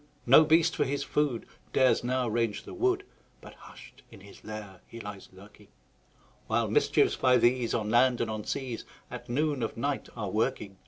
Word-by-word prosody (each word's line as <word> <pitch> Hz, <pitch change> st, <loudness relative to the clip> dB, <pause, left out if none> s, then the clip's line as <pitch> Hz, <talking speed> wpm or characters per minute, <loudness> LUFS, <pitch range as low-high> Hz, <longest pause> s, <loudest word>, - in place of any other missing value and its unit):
No 135 Hz, +6 st, +8 dB
beast, 165 Hz, +2 st, +3 dB
for -, -, +1 dB
his 140 Hz, +1 st, -2 dB
food, 145 Hz, -6 st, -1 dB, 0.3 s
Dares 130 Hz, -2 st, +3 dB
now 125 Hz, 0 st, 0 dB
range 115 Hz, -2 st, -1 dB
the -, -, -10 dB
wood, 380 Hz, +1 st, 0 dB, 0.4 s
But -, -, -13 dB
hush'd -, -, -15 dB
in 110 Hz, -4 st, -15 dB
his 100 Hz, +1 st, -15 dB
lair 105 Hz, -3 st, -9 dB
he 115 Hz, -, -10 dB
lies 100 Hz, -3 st, -9 dB
lurking; 100 Hz, +2 st, -17 dB, 0.8 s
While -, -, 0 dB
mischiefs, -, -, +3 dB
by 125 Hz, -1 st, +3 dB
these, 120 Hz, 0 st, +2 dB
On 110 Hz, -2 st, -2 dB
land 125 Hz, +1 st, +4 dB
and 120 Hz, -, 0 dB
on 110 Hz, -1 st, -4 dB
seas, 125 Hz, -2 st, -4 dB, 0.3 s
At -, -, -8 dB
noon 145 Hz, +1 st, 0 dB
of 115 Hz, -, -3 dB
night 140 Hz, +3 st, -2 dB
are 110 Hz, -, -3 dB
a -, -, -4 dB
working. 105 Hz, -3 st, -2 dB
120 Hz, 190 wpm, -28 LUFS, 105-135 Hz, 0.8 s, No